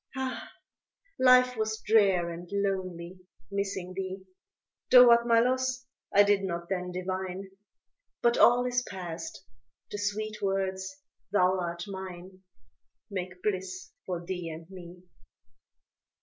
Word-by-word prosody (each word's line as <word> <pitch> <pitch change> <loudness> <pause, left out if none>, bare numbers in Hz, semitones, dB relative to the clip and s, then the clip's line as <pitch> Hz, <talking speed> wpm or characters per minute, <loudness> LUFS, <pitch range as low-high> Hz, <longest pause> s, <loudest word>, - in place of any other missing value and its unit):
Ah, 260 -1 -4 0.7
life 250 -1 +6
was 220 -1 -2
drear 195 -5 +3
and 170 +1 -8
lonely, 185 -3 -3 0.3
missing 195 -2 -3
thee, 190 0 -5 0.6
Though 250 -1 +9
what 235 0 +5
my 230 -1 +5
loss 255 +1 0 0.3
I 205 - +7
did 205 -1 +3
not 170 -2 -4
then 180 -2 -2
divine; 185 +1 -4 0.7
But 235 0 +4
all 245 +1 +5
is 245 0 +1
past 175 -3 -7 0.5
the 205 - -4
sweet 215 +1 -3
words, 195 +6 -2 0.3
thou 185 -2 +3
art 170 -1 -3
mine, 190 -1 -8 0.7
Make 185 -1 -5
bliss 185 -2 -3 0.2
for 175 -2 -4
thee 180 -2 -4
and 160 0 -9
me. 180 -1 -11
190 Hz, 120 wpm, -29 LUFS, 180-215 Hz, 0.7 s, Though